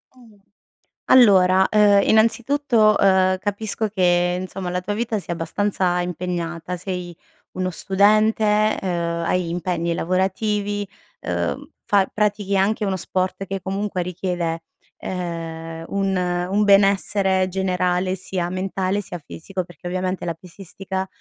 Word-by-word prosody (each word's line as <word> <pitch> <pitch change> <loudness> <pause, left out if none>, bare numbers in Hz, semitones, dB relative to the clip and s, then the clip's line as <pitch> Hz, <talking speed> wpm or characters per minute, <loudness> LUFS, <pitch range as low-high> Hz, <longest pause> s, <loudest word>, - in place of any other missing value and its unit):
Oh, 225 -5 -19 0.7
allora, 190 -6 +6
ehm, 205 -2 +5
innanzitutto 230 0 +3
,ehm, 185 -1 +3
capisco 210 +2 -2
che 180 -3 +2
insomma 185 0 -5
la 180 +1 -1
tua 195 +3 -4
vita 225 0 -1
sia 180 - -4
abbastanza 180 +1 -1
impegnata, 175 -1 -4
sei 180 -1 -5 0.4
uno 185 0 -2
studente, 215 +3 +2
ehm, 170 -2 -2
hai 180 -1 0
impegni 170 -1 -2
lavorativi, 205 +3 -1 0.3
ehm, - - -3 0.2
fa 200 -2 +3
pratichi 205 -1 0
anche 205 +2 +1
uno 195 -1 0
sport, 185 +1 -2
che 195 +1 -3
comunque 195 0 -3
richiede, 175 -2 -3 0.4
ehm, 165 -2 -5
un 195 -1 -1
un 180 +3 0
benessere 195 -1 +3
generale, 185 -1 0
sia 180 -1 -3
mentale, 190 +2 -2
sia 180 - -7
fisico. 180 +4 -6
Perché, 175 0 -11
ovviamente 185 0 -2
la 170 -1 -2
pesistica, 190 +2 -7
190 Hz, 120 wpm, -22 LUFS, 180-205 Hz, 0.7 s, allora